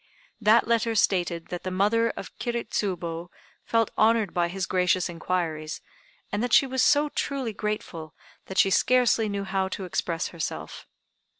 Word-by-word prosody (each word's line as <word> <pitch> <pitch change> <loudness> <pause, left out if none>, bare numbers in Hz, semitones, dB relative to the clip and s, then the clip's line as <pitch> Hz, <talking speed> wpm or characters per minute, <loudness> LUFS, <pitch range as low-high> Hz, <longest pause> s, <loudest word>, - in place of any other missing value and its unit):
That 220 +2 +5
letter 230 -1 +1
stated 175 -5 +1
that 180 - -5
the 185 - -4
mother 210 +5 +2
of - - -8
Kiri 235 -1 -2
Tsubo 175 -3 -3 0.4
felt 230 -1 +1
honored 220 -3 +3
by 175 -1 +1
his 185 +1 -3
gracious 180 0 +1
inquiries, 165 -3 -3 0.5
and 205 - -1
that 245 -1 -1
she - - +7
was 260 -1 -1
so 290 +5 +4
truly 270 -6 -3
grateful 195 -7 -5 0.3
that 190 - -7
she 195 - +5
scarcely 240 -1 +3
knew 200 -1 -2
how 190 0 -1
to 190 0 -5
express 165 0 -2
herself. 80 - -6
195 Hz, 160 wpm, -26 LUFS, 175-230 Hz, 0.5 s, she